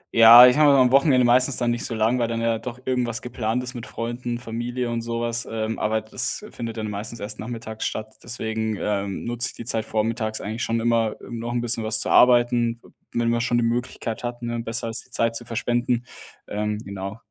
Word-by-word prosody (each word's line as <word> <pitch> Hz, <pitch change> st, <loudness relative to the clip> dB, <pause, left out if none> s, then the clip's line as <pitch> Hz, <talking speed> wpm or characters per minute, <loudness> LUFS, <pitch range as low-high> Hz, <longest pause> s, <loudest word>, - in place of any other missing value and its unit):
Ja, 115 Hz, +2 st, +10 dB
ich 125 Hz, +3 st, +5 dB
habe 150 Hz, -1 st, +6 dB
immer 140 Hz, -1 st, +5 dB
am 125 Hz, -1 st, +4 dB
Wochenende 135 Hz, -3 st, +4 dB
meistens 125 Hz, +2 st, +3 dB
dann 120 Hz, -1 st, +1 dB
nicht 120 Hz, -, -2 dB
so 115 Hz, -, -4 dB
lang, 115 Hz, +3 st, +1 dB
weil 120 Hz, -, +1 dB
dann 115 Hz, 0 st, -2 dB
ja 115 Hz, -1 st, 0 dB
doch 125 Hz, +2 st, -7 dB
irgendwas 125 Hz, -3 st, -1 dB
geplant 120 Hz, 0 st, -2 dB
ist 125 Hz, +1 st, -6 dB
mit 120 Hz, -2 st, -7 dB
Freunden, 120 Hz, +1 st, -4 dB
Familie 120 Hz, +1 st, -4 dB
und 115 Hz, 0 st, -2 dB
so 115 Hz, 0 st, -3 dB
was, 115 Hz, 0 st, -2 dB
ähm, 110 Hz, 0 st, -3 dB
aber 110 Hz, +1 st, 0 dB
das 110 Hz, -, -2 dB
findet 115 Hz, -1 st, -6 dB
dann 110 Hz, -1 st, -3 dB
meistens 105 Hz, +3 st, -5 dB
erst 105 Hz, +1 st, -6 dB
nachmittags 110 Hz, -1 st, -6 dB
statt, 110 Hz, 0 st, -6 dB
deswegen, 110 Hz, -2 st, -3 dB
ähm, 100 Hz, -2 st, -2 dB
nutze 120 Hz, +2 st, +1 dB
ich -, -, -9 dB
die 120 Hz, -, -8 dB
Zeit 115 Hz, -2 st, -1 dB
vormittags 110 Hz, 0 st, -1 dB
eigentlich 110 Hz, +4 st, -5 dB
schon 115 Hz, 0 st, 0 dB
immer 115 Hz, -2 st, +1 dB
um 120 Hz, -2 st, -8 dB
noch 120 Hz, +1 st, -4 dB
'n 120 Hz, -1 st, -1 dB
bisschen 115 Hz, -1 st, -1 dB
was 110 Hz, 0 st, +2 dB
zu -, -, 0 dB
arbeiten, 120 Hz, -1 st, +4 dB
w -, -, -17 dB, 0.3 s
wenn 120 Hz, 0 st, +1 dB
man 115 Hz, 0 st, +1 dB
schon 120 Hz, 0 st, +1 dB
die 120 Hz, -, +2 dB
Möglichkeit 120 Hz, -1 st, -3 dB
hat, 120 Hz, 0 st, -5 dB
ne, 120 Hz, 0 st, -3 dB
besser 115 Hz, 0 st, -3 dB
als 115 Hz, -, -2 dB
die -, -, -23 dB
Zeit 115 Hz, -1 st, 0 dB
zu 120 Hz, -, -2 dB
verschwenden, 120 Hz, +1 st, -1 dB, 0.4 s
ähm, 105 Hz, 0 st, -2 dB
genau. 100 Hz, +2 st, -6 dB
115 Hz, 230 wpm, -23 LUFS, 110-120 Hz, 0.4 s, Ja